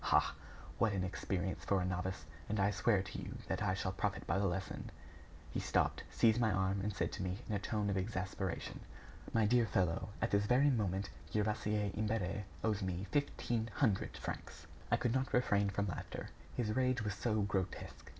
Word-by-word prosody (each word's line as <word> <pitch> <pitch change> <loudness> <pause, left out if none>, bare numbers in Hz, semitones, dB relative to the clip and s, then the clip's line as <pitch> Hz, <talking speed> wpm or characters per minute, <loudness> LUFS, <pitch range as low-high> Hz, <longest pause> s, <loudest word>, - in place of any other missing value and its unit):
Ha! - - +4 0.5
what 110 -3 +3
an 95 -2 0
experience 95 0 -2
for 100 - +2
a 90 - 0
novice! 90 -2 -2 0.2
And 105 0 0
I 100 +1 +4
swear 105 -2 +3
to 95 - -6
you - - -6
that - - -1
I 95 - +2
shall 95 -1 -1
profit 95 +1 -1
by 95 - +1
the 100 - +3
lesson!" 95 +1 -3 0.6
He - - -1
stopped, - - +1
seized 115 +1 +4
my 110 - +4
arm, 95 +1 +1
and 105 +2 0
said 105 - -1
to - - -4
me, 90 0 -1
in 110 - -2
a 100 - +1
tone 105 +1 -1
of 100 - +1
exasperation: 95 -2 -2 0.5
"My 115 -2 +3
dear 120 +1 +4
fellow, 95 0 +1
at 115 - 0
this 100 0 +3
very 135 +5 +5
moment, 100 -5 0 0.2
Gervaise 105 -1 +1
Imbert 105 -2 -1 0.2
owes 110 -2 +1
me 95 0 -2
fifteen 120 -5 0
hundred 110 -8 +1
francs." - - -6 0.2
I - - +4
could 120 - +1
not 130 0 0
refrain 100 -5 +3
from 100 +1 0
laughter, 95 - -5 0.3
his 110 -3 0
rage 130 -2 +2
was 105 -2 -1
so 110 +1 +1
grotesque. 95 -2 -3
100 Hz, 190 wpm, -36 LUFS, 95-110 Hz, 0.6 s, very